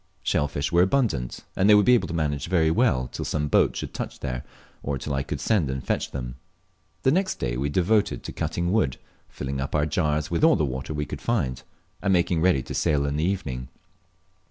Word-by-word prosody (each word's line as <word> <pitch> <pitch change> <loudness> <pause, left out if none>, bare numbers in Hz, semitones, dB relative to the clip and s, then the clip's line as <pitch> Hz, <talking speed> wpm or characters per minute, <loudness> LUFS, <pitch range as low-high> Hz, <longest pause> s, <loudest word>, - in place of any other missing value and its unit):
Shell 75 - +1
fish 70 +2 -3
were 85 +1 +5
abundant, 95 - +1
and 95 +3 +3
they 105 - +9
would 105 -1 +5
be 125 - +6
able 120 - +3
to - - -5
manage 75 -3 -1
very 80 -3 +3
well 80 - +2
till - - -5
some 75 -1 -1
boat - - +3
should - - -5
touch - - -5
there, 60 -1 -4 0.4
or 70 -1 -2
till 70 +2 -4
I 70 - 0
could 70 - -4
send 95 -11 +1
and 65 0 -4
fetch - - -1
them. 60 -1 -6 0.7
The 130 - +4
next 190 +4 +1
day - - -2
we 70 +3 -1
devoted 100 +6 +1
to - - -6
cutting 85 +1 -2
wood, 75 - +1 0.3
filling 70 0 -4
up 70 - -3
our 75 -1 +2
jars 75 0 0
with 85 - 0
all 160 - +7
the 80 - +1
water 65 +3 -4
we 75 0 -1
could - - -7
find, 65 - -1 0.4
and 100 - +1
making 85 -2 +2
ready 80 -7 +3
to - - -7
sail 70 -1 +1
in 70 0 -1
the 75 - 0
evening. 70 -10 -2
75 Hz, 225 wpm, -25 LUFS, 70-95 Hz, 0.7 s, they